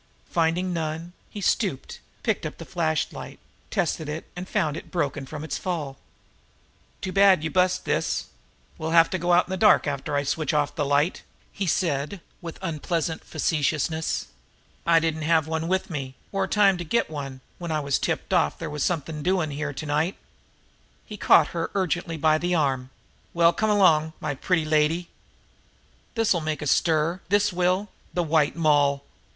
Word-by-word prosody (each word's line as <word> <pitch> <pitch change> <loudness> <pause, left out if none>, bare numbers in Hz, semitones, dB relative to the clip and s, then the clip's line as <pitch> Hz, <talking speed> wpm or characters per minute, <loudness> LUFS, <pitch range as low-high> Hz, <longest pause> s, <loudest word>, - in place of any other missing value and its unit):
Finding 175 +2 +1
none, 165 +1 -3 0.2
he 205 - -7
stooped, 180 - -1 0.2
picked - - 0
up - - -5
the - - -9
flashlight, 160 -4 -2 0.3
tested 165 -5 -1
it, 155 +2 -5
and 180 +1 -6
found 155 -8 0
it - - -8
broken 145 -5 -2
from 150 +2 -6
its 155 - -3
fall. 155 -7 -4 1.0
"Too 190 - -3
bad 195 -4 +5
you 160 - -2
bust 185 0 +2
this, - - 0 0.5
we'll 160 0 -2
have 165 0 +6
to 185 - -1
go 175 +1 0
out 175 +1 +5
in - - -10
the 190 - -1
dark 210 +2 +5
after 145 0 -2
I 140 - +1
switch 150 +1 -1
off 145 -1 +1
the 145 -1 -1
light," 145 +6 +1 0.3
he 200 -2 -3
said 160 +1 0 0.2
with 170 -2 -7
unpleasant 165 -1 -2
facetiousness. 160 +1 -1 0.6
"I 165 -1 +6
didn't 160 -1 -1
have 160 0 +3
one 160 0 -2
with 190 +1 -1
me, 135 -4 -4 0.2
or 195 -1 0
time 195 -2 +4
to - - -3
get 235 +8 +1
one, 140 -4 -6 0.2
when 170 -2 -4
I 155 - +1
got 140 0 -3
tipped - - -2
off 75 - +2
there 160 - -5
was 150 -1 -4
something 160 -2 -2
doing 180 -2 +1
here 145 +1 -3
to 140 +2 -6
night." 150 +5 0 0.9
He 210 - -8
caught 165 -6 +5
her 165 -1 -3
ungently 175 -3 -1
by 155 +1 +3
the 175 +1 0
arm. 135 -5 0 0.5
"Well, 170 0 +5
come 215 +5 0
along, 160 -6 +4
my 150 -1 -2
pretty 160 +4 0
lady! 155 +3 +1 1.1
This'll 215 -7 +2
make 155 -1 -3
a - - -4
stir, 160 +4 +2
this 205 0 +3
will! 185 +3 +1 0.3
The 175 - +2
White 155 -2 +2
Moll!" 145 -3 +3
160 Hz, 175 wpm, -25 LUFS, 150-180 Hz, 1.1 s, have